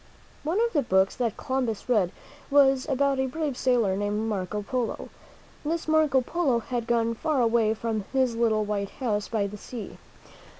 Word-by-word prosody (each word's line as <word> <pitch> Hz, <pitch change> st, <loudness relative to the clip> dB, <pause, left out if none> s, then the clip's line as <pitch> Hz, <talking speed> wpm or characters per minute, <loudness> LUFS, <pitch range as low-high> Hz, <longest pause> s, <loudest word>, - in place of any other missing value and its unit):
One 330 Hz, +7 st, 0 dB
of 470 Hz, 0 st, +1 dB
the 295 Hz, -, +3 dB
books 190 Hz, -5 st, +2 dB
that 235 Hz, -4 st, -1 dB
Columbus 250 Hz, -6 st, -2 dB
read 210 Hz, -8 st, +2 dB, 0.4 s
was 270 Hz, -2 st, +4 dB
about 275 Hz, 0 st, +1 dB
a 265 Hz, -, +1 dB
brave 295 Hz, 0 st, -2 dB
sailor 240 Hz, -7 st, +2 dB
named 205 Hz, +1 st, -1 dB
Marco 210 Hz, -2 st, -2 dB
Polo. 245 Hz, +3 st, -3 dB, 0.5 s
This 325 Hz, +2 st, -2 dB
Marco 310 Hz, -4 st, +4 dB
Polo 275 Hz, -2 st, +1 dB
had 235 Hz, 0 st, -3 dB
gone 230 Hz, -1 st, +1 dB
far 300 Hz, +4 st, -1 dB
away 225 Hz, -2 st, +3 dB
from 220 Hz, -2 st, -3 dB
his 260 Hz, -3 st, +1 dB
little 220 Hz, -2 st, +2 dB
white 200 Hz, -1 st, -2 dB
house 210 Hz, -5 st, -1 dB
by 215 Hz, -3 st, 0 dB
the 205 Hz, +1 st, -6 dB
sea. 225 Hz, +1 st, -8 dB
235 Hz, 170 wpm, -26 LUFS, 215-270 Hz, 0.5 s, was